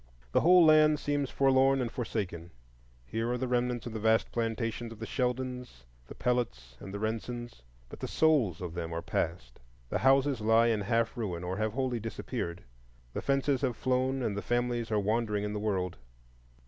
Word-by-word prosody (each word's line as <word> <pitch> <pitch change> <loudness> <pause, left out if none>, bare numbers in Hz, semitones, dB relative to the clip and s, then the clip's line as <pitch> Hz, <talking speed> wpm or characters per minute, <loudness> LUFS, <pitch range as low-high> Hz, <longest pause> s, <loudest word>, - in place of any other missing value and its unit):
The - - +3
whole 180 0 +7
land 155 -1 +6
seems 145 -2 -1
forlorn 135 0 +3
and 120 -3 -2
forsaken. 100 - -4 0.6
Here 115 - -2
are 125 - 0
the 130 - -2
remnants 125 -1 0
of 120 - -6
the 110 - -3
vast 110 +1 +2
plantations 115 0 -2
of 115 - -9
the 115 - -6
Sheldons, 125 - -3 0.2
the - - -10
Pellots, 65 - -2
and 95 - -8
the 100 - -4
Rensons; 115 - -4 0.3
but - - -11
the - - -4
souls 135 - +2
of 90 -2 -5
them 85 -1 -4
are 85 0 -3
passed. 80 -7 -3 0.3
The - - -1
houses 135 -2 +3
lie 115 +2 +4
in 110 -2 +1
half 115 +3 0
ruin, 95 -8 -3
or 90 +2 -3
have 110 0 -1
wholly 130 -2 -1
disappeared; 110 -5 -5 0.5
the - - -3
fences 135 -1 +1
have 130 -4 -1
flown, 130 +1 0
and 110 -4 -1
the 100 - -2
families 120 +2 -1
are 105 - +2
wandering 105 0 0
in 105 0 -3
the 105 - -2
world. 95 -4 -1
115 Hz, 185 wpm, -30 LUFS, 105-130 Hz, 0.6 s, whole